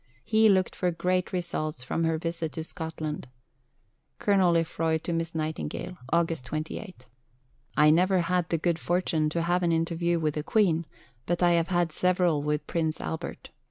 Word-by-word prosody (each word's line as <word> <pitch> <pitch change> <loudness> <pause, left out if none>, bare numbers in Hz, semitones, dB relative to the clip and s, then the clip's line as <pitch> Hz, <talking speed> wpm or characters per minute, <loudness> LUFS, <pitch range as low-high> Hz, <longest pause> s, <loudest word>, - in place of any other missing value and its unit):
He 220 0 +4
looked 190 -2 +2
for 180 - 0
great 180 +2 0
results 155 -6 -3
from 165 +5 -1
her 160 0 +1
visit 165 -1 -3
to 160 - -4
Scotland: 160 -3 -5 0.9
(Colonel 190 -4 +3
Lefroy 165 -1 +1
to 170 +2 -4
Miss 165 0 -2
Nightingale.) 155 +3 -3 0.2
August 165 -4 +1
28.... 155 - -6 0.7
I 150 0 +7
never 180 +3 +4
had 180 0 0
the 165 - +1
good 170 +1 0
fortune 165 -3 +1
to 165 +2 -1
have 175 +1 +1
an 170 -1 +2
interview 170 +1 +1
with 155 -2 0
the 150 - -3
Queen, 170 -5 +2 0.4
but 175 +1 0
I 175 - +5
have 170 -1 +2
had 175 -2 +1
several 180 -3 +2
with 150 0 -1
Prince 160 -1 -1
Albert. 160 - -5
165 Hz, 165 wpm, -27 LUFS, 160-175 Hz, 0.9 s, I